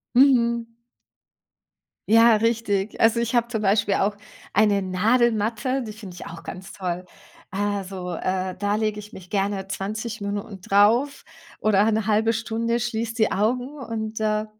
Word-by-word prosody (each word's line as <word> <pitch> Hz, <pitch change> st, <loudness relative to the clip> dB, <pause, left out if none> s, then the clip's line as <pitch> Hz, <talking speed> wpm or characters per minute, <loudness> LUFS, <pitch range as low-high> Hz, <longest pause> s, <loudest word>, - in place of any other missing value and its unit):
Mhm. 235 Hz, -3 st, +4 dB, 1.4 s
Ja, 230 Hz, +1 st, +7 dB
richtig. 215 Hz, -2 st, 0 dB
Also, 230 Hz, +1 st, +4 dB
ich 235 Hz, 0 st, -2 dB
habe 235 Hz, -1 st, +2 dB
zum 225 Hz, -3 st, -3 dB
Beispiel 200 Hz, 0 st, +2 dB
auch 205 Hz, +1 st, 0 dB, 0.3 s
eine 205 Hz, -1 st, +3 dB
Nadelmatte, 225 Hz, +5 st, +1 dB
die 215 Hz, -2 st, -7 dB
finde 205 Hz, -4 st, -10 dB
ich -, -, -9 dB
auch 165 Hz, 0 st, -9 dB
ganz 185 Hz, +1 st, -8 dB
toll. 180 Hz, -1 st, -4 dB, 0.4 s
Also, 195 Hz, -2 st, -3 dB
äh, 185 Hz, +1 st, -2 dB
da 205 Hz, +2 st, 0 dB
lege 215 Hz, -1 st, -1 dB
ich 210 Hz, +1 st, -11 dB
mich 180 Hz, -1 st, -11 dB
gerne 195 Hz, -1 st, -1 dB
20 215 Hz, +4 st, -4 dB
Minuten 200 Hz, -1 st, -5 dB
drauf 215 Hz, +9 st, +3 dB, 0.4 s
oder 210 Hz, 0 st, +3 dB
'ne 220 Hz, -1 st, 0 dB
1/2 220 Hz, +1 st, +2 dB
Stunde, 230 Hz, +1 st, -1 dB
schließe 230 Hz, -1 st, -2 dB
die 220 Hz, -3 st, +2 dB
Augen 250 Hz, +7 st, -1 dB
und, 225 Hz, -4 st, -5 dB
äh, 215 Hz, 0 st, 0 dB
215 Hz, 150 wpm, -24 LUFS, 200-230 Hz, 1.4 s, Ja